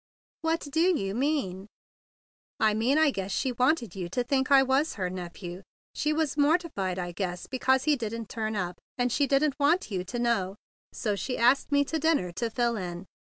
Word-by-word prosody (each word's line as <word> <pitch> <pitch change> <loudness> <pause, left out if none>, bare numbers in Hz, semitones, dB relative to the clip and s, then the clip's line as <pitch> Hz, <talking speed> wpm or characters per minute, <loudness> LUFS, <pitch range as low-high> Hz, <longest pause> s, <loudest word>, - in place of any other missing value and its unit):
"What 325 +1 0
do 325 +5 +2
you 195 0 -2
mean?" 230 -8 -1 0.9
"I 215 -1 +4
mean 235 +7 +2 0.3
she 255 +6 -1
wanted 250 - +1
you 180 -3 -5
to 245 +7 -1
think 265 +1 0
I 275 -1 +7
was 270 +4 +1
her 185 -3 -2
nephew. 180 0 -7 0.3
She 300 - 0
was 305 -2 0
mortified, 290 - +1
I 175 -1 -3
guess, 180 0 -4
because 265 0 +1
he 305 -1 +3
didn't 230 -1 -4
turn 220 0 -3
up, 180 -3 -3 0.2
and 245 -1 +1
she 285 +3 +2
didn't 280 +1 +2
want 295 - +2
you 185 -2 -1
to 195 +7 -5
know. 230 -6 0 0.4
So 210 -3 -2
she 250 +7 -3
asked 245 +5 +3
me 285 0 +3
to 320 +3 -2
dinner 295 - +1
to 230 +6 -2
fill 235 0 0
in. 175 -1 -5
240 Hz, 185 wpm, -28 LUFS, 190-285 Hz, 0.9 s, I